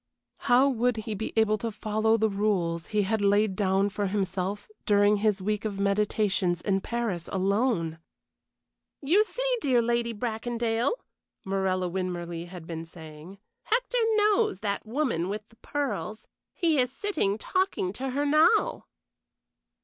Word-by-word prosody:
How 250 +3 +6
would 245 -2 +1
he 220 0 -4
be 215 +2 -4
able 215 -1 +3
to 230 - -2
follow 220 +1 +1
the 220 0 +2
rules 195 -5 -1
he 210 -1 +1
had 220 +2 0
laid 205 0 +3
down 195 0 +2
for 205 0 -2
himself 195 0 -2 0.2
during 205 0 +4
his 205 -2 +1
week 210 +2 -1
of 205 -3 -3
meditations 200 -3 +1
in 195 +1 0
Paris 225 -8 -3
alone? 195 -4 0 1.0
"You 360 +10 +4
see, - - -1
dear 255 -4 +3
Lady 235 0 +1
Bracondale," 230 - -1 0.5
Morella 190 -1 0
Winmarleigh 175 -2 -4
had 175 -2 -10
been 165 -1 -5
saying, 160 +2 -12 0.2
"Hector - - 0 0.2
knows 425 0 +2
that 205 0 -2
woman 230 - -1
with 210 +1 -5
the 225 - -22
pearls. 220 - -4 0.3
He 325 -5 +2
is 250 -1 +2
sitting 270 - -1
talking 370 - -1
to 265 +5 -4
her 285 +3 -1
now." 310 +10 +3
210 Hz, 140 wpm, -27 LUFS, 190-245 Hz, 1.0 s, How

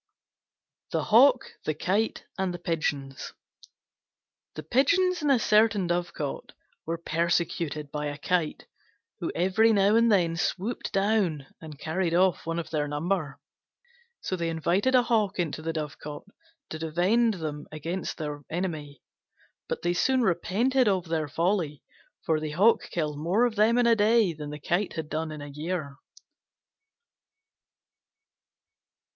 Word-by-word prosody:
THE - - -1
HAWK, 250 +3 +6 0.2
THE 155 - -2
KITE, 200 +8 -1
AND 190 -2 -2
THE - - -5
PIGEONS 145 -5 -3 1.2
The - - -6
Pigeons 365 +8 +2
in 295 - 0
a 275 - +5
certain 215 -3 +3
dovecote 175 - -3 0.3
were 165 - -1
persecuted 165 -3 -1
by 150 0 -3
a 145 0 -5
Kite, 175 -1 -1 0.5
who - - -3
every 190 +6 +3
now 200 0 +4
and 230 0 +4
then 170 -5 +2
swooped 195 +6 -2
down 195 -8 +1 0.2
and 155 -2 -9
carried 165 +3 -1
off 180 -2 +2
one 165 0 -2
of 170 - -5
their 150 -2 0
number. 150 0 -2 0.8
So 185 - -2
they 170 -2 -2
invited 175 +10 +1
a 250 - +5
Hawk 220 -4 +1
into 165 -3 -2
the 165 +1 -2
dovecote 150 -1 -6 0.5
to 155 - -5
defend 185 +8 +2
them 150 -4 -5
against 165 +5 -4
their 150 -2 -5
enemy. 155 -5 -4 0.7
But - - -3
they 175 0 +1
soon 255 +8 +2
repented 230 +8 +2
of 185 -4 0
their 160 -2 -1
folly: 165 -2 -1 0.4
for 160 -1 +2
the 155 0 -4
Hawk 205 +8 +3
killed 150 -3 -2
more 185 +10 +2
of 240 - 0
them 220 +3 +4
in 245 - +3
a 235 -1 +5
day 215 -3 +3
than 150 -1 -7
the 150 0 -7
Kite 175 +6 -1
had 160 -2 -5
done 160 0 -3
in 150 -1 -7
a 145 - -8
year. 150 0 -4
175 Hz, 145 wpm, -27 LUFS, 155-210 Hz, 1.2 s, HAWK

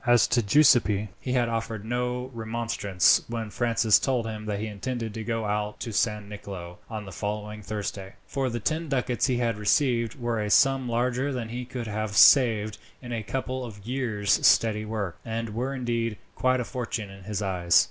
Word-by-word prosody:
As 120 -2 +5
to 120 - +3
Giuseppi, 110 -4 +4
he 130 0 -1
offered 115 -3 -1
no 125 +2 -2
remonstrance 110 -5 +2
when 115 -2 -4
Francis 115 -2 +3
told 125 -4 0
him 110 -1 -6
that 100 -1 -2
he 110 - -2
intended 110 +1 -4
to 110 - -5
go 115 -1 -2
out 105 0 -2
to 115 - -4
San 105 -1 0
Nicolo 95 -4 -8
on 110 -2 -5
the 95 - -9
following 105 +2 -4
Thursday, 100 -2 -5
for 135 0 -1
the 120 0 -3
ten 160 +7 -1
ducats 125 -2 0
he 125 -2 +1
had 115 -3 0
received 115 +2 +1
were 120 -2 -1
a 105 - -2
sum 135 +2 +4
larger 125 +4 0
than 120 -4 -4
he 125 +2 -5
could 125 -1 -5
have 110 -1 -3
saved 110 -6 +6 0.2
in 120 -2 -9
a 115 - -2
couple 130 +3 -3
of 105 -4 -9
years' 115 -5 0
steady 110 -1 +4
work, 105 -5 -4
and 115 0 -3
were 125 +4 -2
indeed 115 -3 -2 0.2
quite 130 0 +1
a 125 - -2
fortune 115 -5 -4
in 95 -1 -13
his 105 -1 -3
eyes. 90 -3 +3
115 Hz, 190 wpm, -26 LUFS, 105-125 Hz, 0.2 s, saved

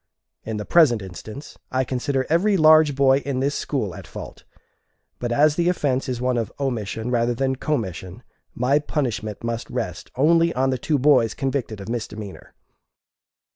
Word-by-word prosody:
In 110 -1 -4
the 105 - -5
present 125 - +4
instance, 110 +10 -10
I 130 0 +1
consider 130 +1 -1
every 190 +5 +2
large 155 -2 +6
boy 135 0 +4
in 140 -2 -3
this 140 +2 0
school 125 - -2
at - - -10
fault, - - -10 0.7
but 120 -1 -3
as 150 +4 +3
the 175 0 +2
offence 135 -7 0
is 125 -2 -2
one 125 0 0
of 115 - -3
omission 120 -3 -3
rather 120 0 +1
than 135 +1 0
commission, 105 - -4 0.3
my 130 +4 +2
punishment 120 -9 -3
must 115 0 -3
rest 110 -7 -4
only 165 +4 +3
on 130 +1 +1
the 130 - -2
two 150 +4 0
boys 135 -5 +3
convicted 130 -6 -2
of 100 - -8
misdemeanor. 110 -4 -6
130 Hz, 165 wpm, -23 LUFS, 115-145 Hz, 0.7 s, large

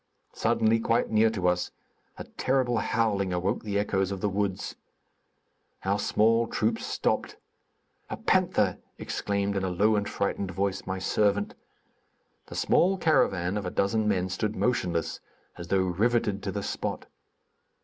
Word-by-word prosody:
Suddenly, 110 +1 +2
quite 115 +1 +1
near 110 +1 +4
to 95 -5 -1
us, 90 0 +1 0.5
a - - -6
terrible 130 -3 0
howling 105 -5 0
awoke 90 +5 -1
the 100 -2 -2
echoes 100 -2 0
of 100 - -3
the 105 - 0
woods. 100 -1 -2 1.1
Our 100 +2 +1
small 115 +3 +3
troop 110 +1 0
stopped. - - -1 0.7
"A - - -4
panther!" - - +2 0.2
exclaimed, 100 0 -2
in 95 - -1
a 95 - 0
low 105 +5 +2
and 105 -1 -1
frightened 100 -1 -2
voice, 95 +1 -2
my 95 0 -2
servant. 100 +1 +1 0.9
The - - -9
small 190 +2 +3
caravan 95 - +2
of 100 - -3
a - - -1
dozen 105 +4 +1
men 95 -3 +1
stood 105 +3 -2
motionless, 90 -9 0 0.4
as 85 -1 -8
though 95 +2 +2
riveted 105 +2 +1
to - - -3
the - - -4
spot. - - -3
100 Hz, 150 wpm, -27 LUFS, 95-110 Hz, 1.1 s, near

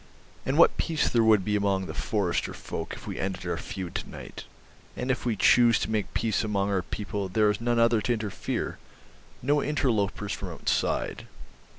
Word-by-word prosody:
And 135 +3 +1
what 170 - +6
peace 160 -2 +1
there 115 -1 +3
would 110 -4 +4
be 105 - +1
among 100 -2 +1
the - - -6
forester 90 -6 -1
folk - - -5
if - - -12
we - - -5
ended 95 -1 -3
our - - -1
feud 90 -3 -6
to - - -4
night. - - -9 0.5
And 125 +1 0
if 125 - -2
we 115 - +1
choose 120 +2 +5
to - - -2
make 105 -2 -2
peace 115 -1 +1
among 100 -2 0
our 95 -2 +1
people 100 +2 -4
there 105 +3 +3
is 105 - -4
none 120 0 +1
other 115 -1 +4
to 120 - +1
interfere, 105 -4 -3 0.6
no 145 +3 +3
interlopers 105 -8 0
from 95 - -5
outside 80 - -1
105 Hz, 190 wpm, -27 LUFS, 100-120 Hz, 0.6 s, what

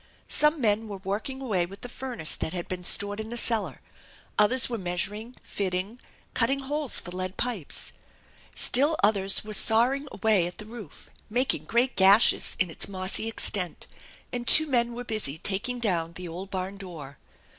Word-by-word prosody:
Some 300 +1 +3
mem 220 -2 0
were 200 -2 -6
working 210 +8 -5
away 195 -9 -1
with 195 +3 -13
the - - -6
furnace 245 -9 0
that 160 - -4
had 175 -2 -5
been 180 -1 -6
stored 205 +3 -3
in 220 0 -6
the 240 - -5
cellar; 210 - 0 0.5
others 230 +5 +3
were 235 -2 -4
measuring, 205 +6 -3
fitting, 195 +4 -3 0.3
cutting 270 +3 0
holes 290 0 -1
for 175 - -9
lead 185 +1 -5
pipes; 230 - -3 0.6
still 290 +5 +5
others 195 -2 +3
were 215 - -7
sawing 245 +7 +3
away 210 -6 +2
at 180 - -9
the 215 - -9
roof, 215 -7 -11 0.2
making 235 - 0
great 240 +7 +1
gashes 195 +3 +5
in 185 -3 0
its - - -1
mossy 190 +3 +1
extent; 200 -5 -1 0.5
and 240 -1 -4
two 315 - +9
men 240 -4 0
were 245 +1 -6
busj 195 - -3
taking 205 +6 0
down 170 -7 -1
the 180 +1 -8
old 180 +4 -8
barn 190 +1 -5
door. 160 -8 -10
210 Hz, 170 wpm, -26 LUFS, 185-240 Hz, 0.6 s, two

